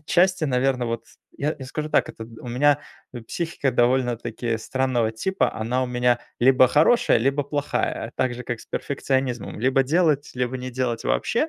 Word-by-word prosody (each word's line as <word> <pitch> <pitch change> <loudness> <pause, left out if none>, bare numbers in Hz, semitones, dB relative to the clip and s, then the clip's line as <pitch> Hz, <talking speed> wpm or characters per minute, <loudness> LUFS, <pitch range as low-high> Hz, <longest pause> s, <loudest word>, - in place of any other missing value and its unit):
отчасти, 180 +3 +2
наверно, 125 -2 +1
вот, 115 0 -3 0.3
я 150 +2 -1
я 135 - -7
скажу 155 +3 -4
так, - - +3
как - - -9
у 110 - -4 0.2
у 125 - -6
меня, 145 +4 +3 0.3
э, 120 - -7
психика 145 +3 -2
довольно-таки 120 -2 0
странного 120 -1 0
типа, 125 +1 0
она 120 +4 -1
у 130 - -1
меня 125 0 +1 0.2
либо 130 0 +6
хорошая, 155 - +4
либо 135 +4 +1
плохая, 145 -5 -2
также 125 -1 -1
как 120 -2 -4
с - - -15
перфекционизмом, 130 -5 -2
либо 130 +2 +3
делать, 150 0 +1
либо 125 +1 -1
не 130 0 -6
делать 120 -2 -2
вообще. 300 +8 +1
130 Hz, 170 wpm, -24 LUFS, 120-145 Hz, 0.3 s, либо